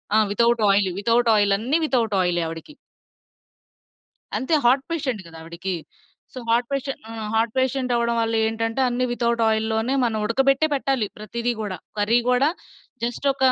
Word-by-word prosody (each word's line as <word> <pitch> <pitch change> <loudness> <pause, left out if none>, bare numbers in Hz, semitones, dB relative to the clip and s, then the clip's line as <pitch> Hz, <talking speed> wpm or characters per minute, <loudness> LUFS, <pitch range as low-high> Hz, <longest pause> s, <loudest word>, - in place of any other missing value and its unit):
ఆ! - - +6
Without 235 +2 +2
oil. 195 -1 +3
Without 235 +1 +2
oil. 205 -1 +3
అన్ని 255 +9 0
without 235 -7 0
ఆయిలే 175 -1 +1
ఆవిడికి. 165 - -9 1.6
అంతే. 265 +5 -2
హార్ట్ 265 +3 +4
పేషెంట్ 260 - -2
గదా 165 -1 -12
ఆవిడకి. 170 +3 -4 0.6
సో, 255 - -6
హార్ట్ 235 +1 +2
పేష 275 0 -1 0.2
ఆహ్, 220 -2 -5
హార్ట్ 225 0 +1
పేషెంటవ్వడం 250 -3 +1
వల్ల 225 0 0
ఏంటంటే, 225 +3 -1
అన్నీ 250 +1 0
వితౌట్ 235 -1 0
ఆయిల్‌లోనే 220 +3 0
మనం 220 -2 -1
ఉడకబెట్టే 270 +6 +2
పెట్టాలి 265 -5 0
ప్రతిదీ 235 +3 -3
గూడా. 190 -4 -4 0.2
కర్రీ 225 +4 +3
గోడా 260 +4 +3 0.5
జస్టొకా 265 +2 +1
235 Hz, 145 wpm, -23 LUFS, 215-260 Hz, 1.6 s, ఆ